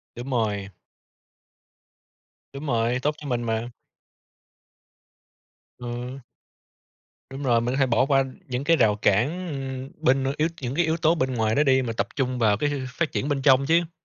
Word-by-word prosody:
Đúng 125 +3 -7
rồi. 105 -5 -1 1.8
Đúng 140 +2 -7
rồi. 120 -1 +1
Tốt 150 +1 +1
cho 145 - -8
mình 120 -1 -1
mà. 115 +1 -2 2.1
Ờ. 125 +2 -6 1.1
Đúng 135 +1 -7
rồi. 120 -4 +3
Mình 120 +2 -1
có - - -1
thể 135 - +4
bỏ 125 +2 +2
qua 135 -2 +3 0.2
những 125 +1 -3
cái 165 +2 +4
rào 110 -7 +3
cản, 145 - +1
ừm, 135 -2 -5
bên, 135 +1 +3
ơ, 135 - 0
yếu 155 +2 +2
những 125 0 -3
cái 175 +2 +2
yếu 160 +1 +1
tố 165 0 +3
bên 130 -5 -1
ngoài 110 -1 +1
đó 145 - +3
đi, 130 -2 +3
mà 120 -2 -3
tập 115 - -2
trung 130 -2 -1
vào 105 -3 +3
cái, 145 +7 0
ơ, 145 - -2
phát 150 +5 -2
triển 140 - -2
bên 140 -2 -1
trong 135 0 +5
chứ. 165 +2 +2
130 Hz, 185 wpm, -25 LUFS, 120-145 Hz, 2.1 s, trong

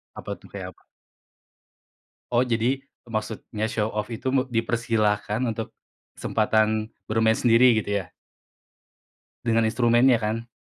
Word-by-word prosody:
Apa - - -7
tuh, - - -16
kayak - - -6
apa? - - -28 1.5
Oh, 120 +1 +4
jadi 120 +3 +1 0.2
maksudnya 110 -1 -4
show 110 0 -1
off 105 0 -2
itu 115 - -5
me 135 -1 +3
dipersilahkan 115 -2 0
untuk 115 -2 -3 0.4
kesempatan 110 0 +1 0.2
bermain 110 0 +3
sendiri 115 -1 +5
gitu 100 0 -1
ya? - - -24 1.3
Dengan 115 -2 +2
instrumennya 120 +2 +4
kan? 115 +2 -2
115 Hz, 120 wpm, -25 LUFS, 110-120 Hz, 1.5 s, sendiri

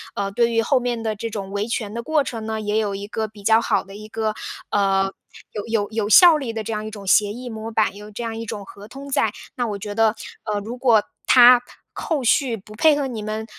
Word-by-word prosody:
呃， 200 0 -2
对 235 +3 +2
于 230 0 +2
后 260 +3 +2
面 240 -2 -2
的 220 -1 -1
这 230 +2 -5
种 200 -3 -6
维 205 +2 -2
权 220 -3 -3
的 235 - -4
过 300 +3 +1
程 225 -4 -6
呢， 220 0 -3
也 210 0 -1
有 205 -2 0
一 200 +1 -6
个 220 0 -3
比 205 -1 -15
较 225 +2 +4
好 - - +1
的 195 0 -13
一 215 +1 -9
个， 220 0 -2 0.4
呃， 195 -1 +1 0.4
有 205 - -5
有 220 -3 0
有 215 -1 -1
效 335 - +8
力 265 -6 -4
的 220 -1 -4
这 225 +1 -4
样 215 0 -4
一 - - -5
种 205 -2 -9
协 205 +2 +4
议 245 +2 -7
模 220 0 -6
板， 215 -3 +1
有 210 +1 -10
这 235 +3 -6
样 225 -1 -4
一 230 - -5
种 205 -1 -6
合 200 +2 -12
同 275 +4 -10
在。 225 -5 +1 0.2
那 245 -2 -1
我 205 - -3
觉 205 +1 -6
得， 225 -1 +3 0.3
呃， 210 -2 -1
如 230 +4 -7
果 235 -5 +4 0.2
它 245 -1 +8 0.3
后 300 -6 -2
续 245 -1 +2
不 210 +2 -14
配 305 +7 +4
合 280 -2 -1
你 225 -4 -5
们， 215 +1 -4
220 Hz, 275 characters per minute, -22 LUFS, 205-235 Hz, 0.4 s, 效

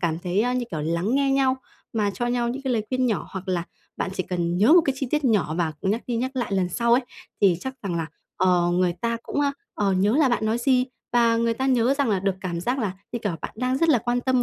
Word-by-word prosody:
cảm 165 -1 0
thấy 180 +5 0
như 245 - -1
kiểu 155 -4 -3
lắng 170 - 0
nghe 275 -1 +2
nhau, 265 -1 +2 0.4
mà 210 -3 +1
cho 220 +6 -3
nhau 240 -1 0
những 265 +3 -4
cái 260 -2 -1
lời 220 - +1
khuyên 255 0 +1
nhỏ. 220 - -1
Hoặc 190 0 -7
là 175 -2 0 0.3
bạn 185 - -2
chỉ 185 - -1
cần 175 -1 -2
nhớ 215 - +5
một 350 - +8
cái 275 - 0
chi 270 - -2
tiết 300 -2 0
nhỏ 200 -10 +2
và 160 -2 0
nhắc 210 +5 0
đi 240 -2 -1
nhắc 255 +3 -1
lại 240 -5 -2
lần 185 -2 +1
sau 235 +5 +1
ấy, 245 - +6 0.4
thì 190 -4 +5
chắc 265 0 -5
rằng 195 -4 -2
là, 165 -1 -2 0.3
ờ, 180 -2 +3
người 180 0 +2
ta 235 0 0
cũng, 290 - -2 0.3
ờ, 200 -2 +1
nhớ 205 +7 +2
là 300 -4 +4
bạn 230 -2 0
nói 225 +2 +1
gì, 255 0 +3 0.3
và 235 -1 +4
người 230 0 +1
ta 265 +3 -2
nhớ 255 0 +3
rằng 280 -3 0
là 200 -3 +2
được 195 0 0
cảm 170 -2 -3
giác 250 +8 -1
là, 205 -6 -1 0.2
như 235 - -2
kiểu, 205 - -1
bạn - - -4
đang 255 +2 0
rất 330 - +2
là 275 -7 +5
quan 240 +2 -1
tâm 255 -1 +2
230 Hz, 275 wpm, -24 LUFS, 185-255 Hz, 0.4 s, một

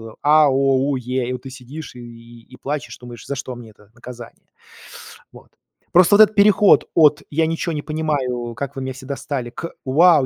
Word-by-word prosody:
Это: 110 -1 -11
"а", 150 0 +5
"о", 135 - +1
"у", 135 +1 +1
"е". 125 0 -3
И - - -2
вот 125 -1 -6
ты 135 - -9
сидишь 130 +2 -10
и 120 -1 -13
и 130 - -15
плачешь, 145 -1 -5
думаешь: 120 -3 -12
"За 140 - -3
что 130 -2 -6
мне 115 -2 -12
это 105 -1 -23
наказание?" 120 -1 -12 0.9
Вот. - - -16 0.4
Просто 180 +3 +6
вот 215 - +7
этот 215 0 +5
переход 205 0 +4
от 150 -2 +4
"я 160 +2 +1
ничё 165 +1 -3
не 150 -2 -3
понимаю, 135 -7 -3
как 140 +1 -6
вы 135 - -5
меня 130 0 -4
все 130 0 -12
достали" 135 -2 -5
к 170 +7 -7
"вау, 155 +2 +4
135 Hz, 205 wpm, -20 LUFS, 125-155 Hz, 0.9 s, вот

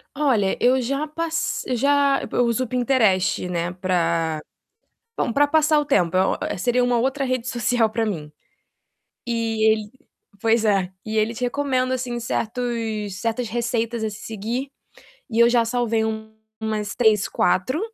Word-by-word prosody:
Olha, 245 -10 +2
eu 255 +1 +3
já 275 +5 -2
pas 330 +2 -2
já 280 +2 +3
eu 245 - +2
uso 235 +2 +1
o - - -4
Pinterest, 225 -8 +2
né, 175 0 -2
para 170 -3 0 0.8
bom, - - 0
para 290 +4 +4
passar 310 0 +3
o 295 - +1
tempo, 180 - +2
é 185 - +1
o - - -7
seria 245 +5 +2
uma 245 -1 +2
outra 270 +3 0
rede 255 -1 -2
social 240 -2 +1
para 225 +1 0
mim. 155 -8 -4 1.0
E 225 -2 +2
ele 215 -1 -2 0.5
pois 225 0 +2
é, 195 -3 +2
e 220 0 -3
ele 215 +2 +1
te 245 - -5
recomenda 255 0 0
assim 245 -1 -3
certos 225 -4 -3
certas 230 +1 -1
receitas 235 0 -1
a 220 - 0
se 210 - -9
seguir 225 +5 -4 0.6
e 225 - -2
eu 235 - +7
já 240 -1 +3
salvei 230 -1 0 0.6
umas 215 -2 -3
3, 215 -4 +3
4, 185 - +1
230 Hz, 155 wpm, -22 LUFS, 215-255 Hz, 1.0 s, eu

